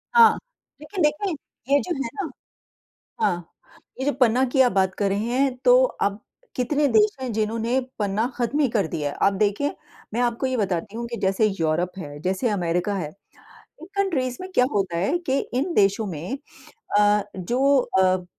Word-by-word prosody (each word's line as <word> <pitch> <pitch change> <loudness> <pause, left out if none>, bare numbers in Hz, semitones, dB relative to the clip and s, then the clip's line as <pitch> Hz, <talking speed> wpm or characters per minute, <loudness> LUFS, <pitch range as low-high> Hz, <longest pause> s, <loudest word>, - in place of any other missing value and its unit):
हाँ। 465 -1 +7 0.4
लेकिन 360 +5 -5
देंखें 300 +6 +1 0.4
ये 285 - +6
जो 355 - -3
है 230 - -4
ना 390 -6 -3 0.9
हाँ, 175 - -1 0.5
ये 265 - -2
जो 290 - +3
पन्ना 250 0 +4
की 265 +1 +2
आप 250 - +4
बात 190 -1 +2
कर 200 -1 +1
रहे 200 +2 0
हैं 260 +1 +1
तो - - +7
अब 200 - -2 0.4
कितने 285 +4 +1
देश 215 -1 +4
हैं 255 -2 -3
जिन्होंने 225 +3 0 0.2
पन्ना 205 +2 0
खत्म 245 +5 0
ही 285 - +4
कर 210 -7 0
दिया 150 -2 -2
है। - - -7
आप 200 - +2
देखिए, 210 +8 0 0.4
मैं 235 - 0
आपको 240 +1 0
ये 260 - -1
बताती 195 -1 -2
हूँ 235 - -3
कि 235 0 -5
जैसे 195 +3 +2
यूरोप 165 +3 +1
है, 145 -4 -7
जैसे 190 +7 0
अमेरिका 180 0 0
है, 160 -6 -3 0.7
इन 330 - -9
कंट्रीज़ 275 -11 0
में 370 +1 -7
क्या 250 - +5
होता 190 -4 0
है 195 - +1
कि 270 +1 +2 0.2
इन 295 +8 0
देशों 200 +2 +3
में 180 - -5 0.6
अ, 210 0 +4 0.2
जो 260 +9 +2 0.2
अ 185 -1 +2
225 Hz, 185 wpm, -24 LUFS, 190-265 Hz, 0.9 s, हाँ